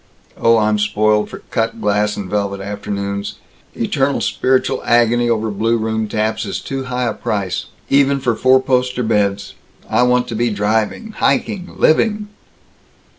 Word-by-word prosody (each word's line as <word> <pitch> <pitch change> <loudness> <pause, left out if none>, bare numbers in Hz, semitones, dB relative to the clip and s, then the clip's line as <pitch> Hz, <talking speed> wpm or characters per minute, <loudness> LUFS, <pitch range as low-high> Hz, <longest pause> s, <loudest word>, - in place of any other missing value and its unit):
Oh, 115 0 +3
I'm 105 -1 +2
spoiled 105 0 +1
for - - -10
cut 115 -1 -1
glass 105 0 0
and 100 - -5
velvet 100 0 -2
afternoons. 100 0 -4 0.4
Eternal 135 +4 0
spiritual 130 0 +1
agony 120 0 +3
over 110 -1 0
blue 115 +3 +1
room 110 0 -1
taps 110 +1 -1
is - - -4
too 135 -1 -5
high 125 0 -2
a 115 - -1
price 100 -4 -3 0.2
even 140 0 +3
for 120 -3 0
four 130 +3 +4
poster 125 -1 0
beds. 100 -3 0 0.3
I - - +2
want 125 0 +2
to 115 - -4
be 120 +2 +1
driving! 110 - -1
hiking! 195 -3 -1
living!" 210 +5 +2
110 Hz, 150 wpm, -18 LUFS, 105-125 Hz, 0.4 s, four